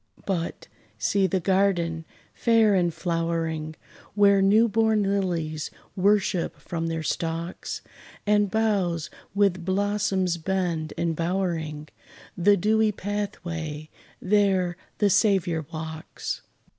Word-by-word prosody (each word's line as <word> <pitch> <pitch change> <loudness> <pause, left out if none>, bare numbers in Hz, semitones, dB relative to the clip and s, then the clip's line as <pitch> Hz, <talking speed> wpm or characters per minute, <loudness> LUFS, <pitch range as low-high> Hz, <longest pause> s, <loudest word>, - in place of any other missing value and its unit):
But, 175 -4 -3 0.3
see 190 - +2
the 190 0 0
garden, 175 -3 +1 0.3
fair 225 -3 +4
and 175 -3 +2
flowering, 165 -2 -2 0.4
Where 200 -1 +5
new 210 +4 +5
born 220 -1 +2
lilies 175 -6 -1 0.3
worship 195 -2 +1
from 165 -1 -4
their 165 -1 -2
stalks; 165 +2 -3 0.4
And 205 -1 +3
boughs 195 -7 0 0.2
with 195 -3 +2
blossoms 190 -1 0
bend, 170 -3 -1
embowering 165 -2 -1 0.5
The 200 +3 +4
dewy 215 +3 +3
pathway! 175 -7 -4 0.3
there 190 -3 +2 0.2
the 205 -2 +3
Saviour 175 -7 +2
walks. 160 -1 -5
185 Hz, 100 wpm, -25 LUFS, 165-205 Hz, 0.5 s, Where